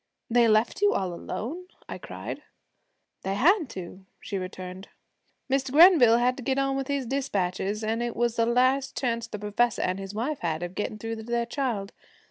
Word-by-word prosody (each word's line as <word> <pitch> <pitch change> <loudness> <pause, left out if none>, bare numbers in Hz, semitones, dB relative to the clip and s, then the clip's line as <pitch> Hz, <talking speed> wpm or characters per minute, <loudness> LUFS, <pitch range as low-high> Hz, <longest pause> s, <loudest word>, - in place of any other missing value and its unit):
'They 240 0 +5
left 215 - +2
you 410 0 +4
all 185 -2 -1
alone!' 305 - -5 0.2
I - - -6
cried. - - -7 0.8
'They 195 +1 -2
had 340 - +4
to,' 185 -1 -9
she 200 -3 -4
returned. 185 +1 -7 0.6
'Mr. 270 -1 0
Grenville 295 -7 +7
had 250 +1 +2
to 260 - -7
get 265 +2 0
on 275 0 +1
with 270 -1 -2
his 280 -2 -1
dispatches, 210 -6 -2
an' 225 +2 -1
it 240 -1 -2
was 235 -1 0
the 230 -1 +2
last 255 +3 +2
chance 230 -3 -1
the 210 - -6
professor 210 +3 0
an' 185 +1 -1
his 195 +1 -7
wife 270 +7 -2
had 165 -1 -2
of 175 0 -5
gettin' 210 +2 -3
through 225 +1 -5
to 220 - -7
their 235 +1 -1
child. 235 -6 -3
230 Hz, 190 wpm, -27 LUFS, 200-265 Hz, 0.8 s, Grenville